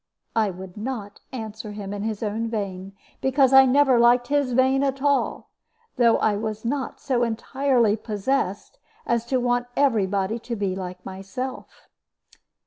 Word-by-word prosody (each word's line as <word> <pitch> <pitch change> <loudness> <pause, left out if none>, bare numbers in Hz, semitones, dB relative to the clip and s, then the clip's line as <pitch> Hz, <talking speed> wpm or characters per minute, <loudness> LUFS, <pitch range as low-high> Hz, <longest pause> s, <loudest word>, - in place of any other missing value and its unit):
I 220 -2 +2
would 185 0 -9
not 210 -3 -5
answer 220 -3 -6
him 205 -1 -6
in 205 - -4
his 215 0 -3
own 220 +2 -2
vein, 195 -3 -4 0.3
because 265 0 +3
I 265 0 +8
never 265 -1 +4
liked 245 +1 +4
his 285 -3 +1
vein 260 +2 +3
at 275 -1 0
all; 280 0 0 0.5
though 235 -2 +5
I 210 - +2
was 215 +1 -4
not 265 +2 -2
so 260 -4 0
entirely 240 -1 +1
possessed 215 - -2 0.3
as 235 0 0
to 260 +1 +1
want 245 0 0
every 230 -9 +3
body 200 +3 -1
to 235 +1 -5
be 200 -3 -2
like 180 -1 -7
myself. 195 +7 -7
230 Hz, 155 wpm, -24 LUFS, 205-260 Hz, 0.5 s, I